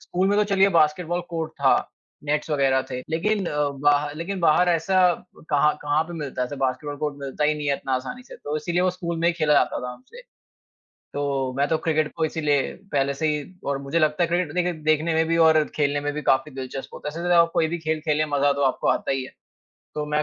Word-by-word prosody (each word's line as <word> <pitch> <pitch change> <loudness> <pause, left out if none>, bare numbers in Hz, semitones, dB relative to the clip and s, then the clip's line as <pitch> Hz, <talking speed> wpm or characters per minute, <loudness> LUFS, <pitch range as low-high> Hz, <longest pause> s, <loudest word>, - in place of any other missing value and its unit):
School 185 +2 -1
में 205 - +2
तो 210 - +4
चलिए 195 0 +5
बास्केटबॉल 170 +3 +1
कोर्ट 165 -2 -3
था, - - +5 0.5
नेट्स 150 +1 -1
वगैरह 135 -3 +2
थे 125 -1 -3
लेकिन 200 +5 0
अ, 150 -2 0
बाह 145 +1 +2
लेकिन 185 +4 -4
बाहर 170 +2 +4
ऐसा 175 +2 +2 0.5
कहाँ 150 +1 +3
कहाँ 145 +1 +2
पे 175 - -9
मिलता 145 -6 -4
है। - - 0
ऐसा 145 +3 -7
बास्केटबॉल 135 +2 -2
कोर्ट 150 -1 -3
मिलता 140 +2 -2
ही 150 +1 +3
नहीं 150 -1 -5
है 140 - +3
इतना 135 - -5
आसानी 135 - -4
से, 250 - -12
तो 150 +1 -4
इसीलिए 175 +3 -1
वो 185 - +3
स्कूल 170 -2 -4
में 170 +1 +2
ही - - +2
खेला 155 -3 +1
जाता - - +2
था 125 - -5
हमसे। 465 - -14 0.9
तो 140 -2 -1
मैं 140 - +2
तो 160 - +2
क्रिकेट 155 -2 0
को 160 - 0
इसीलिए 150 -3 0 0.2
पहले 140 0 +1
से 155 +3 -1
ही 150 -1 0 0.3
और 140 -1 0
मुझे 140 +4 -1
लगता 155 +1 +2
है 170 - +2
क्रिकेट 175 -3 0
देख 180 -1 0
देखने 155 +1 +2
में 160 0 +3
भी 165 - +2
और 155 -1 +5
खेलने 145 -1 +1
में 145 0 -2
भी 150 - -4
काफ़ी 140 +3 +2
दिलचस्प 130 0 -7
होता - - -6
है। 150 - -7
वैसे 175 - -2
तो 175 - +4
आप 170 0 +3
कोई 160 - +3
भी 170 +2 -3
खेल 160 -1 -2
खेलें, 155 -1 +1
मज़ा 145 0 +3
तो 140 0 -2
आपको 130 - 0
आता - - +1
ही 135 -1 -1
है। - - -11 0.6
तो 150 0 -3
मैं 150 0 0
150 Hz, 245 wpm, -24 LUFS, 145-170 Hz, 0.9 s, चलिए